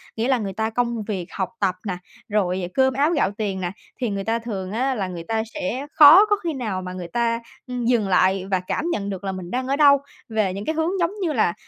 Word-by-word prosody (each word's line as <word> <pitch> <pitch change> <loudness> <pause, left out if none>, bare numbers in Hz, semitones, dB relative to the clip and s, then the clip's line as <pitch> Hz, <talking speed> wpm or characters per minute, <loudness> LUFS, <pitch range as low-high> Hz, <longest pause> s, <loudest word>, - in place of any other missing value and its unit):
nghĩa 230 +3 -1
là 260 -2 +3
người 200 -4 -4
ta 220 +2 -1
công 235 -1 -1
việc, 195 -5 -3
học 190 +1 -2
tập 190 -3 +1
nà, 180 -2 -2 0.3
rồi 185 -3 0
cơm 265 0 +3
áo 290 +5 +2
gạo 280 - +1
tiền 195 -3 -2
nè, 175 0 -2 0.3
thì 240 - 0
người 200 -1 -3
ta 225 +2 0
thường 200 -5 -5
á 260 +4 0
là 195 -4 -2
người 175 -2 -6
ta 220 -1 0
sẽ 280 -2 -3
khó 315 +8 +9
có 415 -1 +2
khi 330 -2 -1
nào 215 -8 -3
mà 180 0 -6
người 180 -2 -6
ta, 230 +4 0 0.3
ừm, 250 -2 -3
dừng 230 -5 +2
lại 190 0 +3
và 185 - +3
cảm 185 - -3
nhận 200 -6 -2
được 190 0 -5
là 195 - -2
mình 185 -1 -7
đang 255 +1 -2
ở 275 - +1
đâu, 285 -1 +6 0.3
về 215 -4 0
những 200 +2 -6
cái 315 - -1
hướng 320 +1 +1
giống 340 +1 +1
như 325 -4 0
là 215 -7 +2
220 Hz, 255 wpm, -23 LUFS, 190-260 Hz, 0.3 s, khó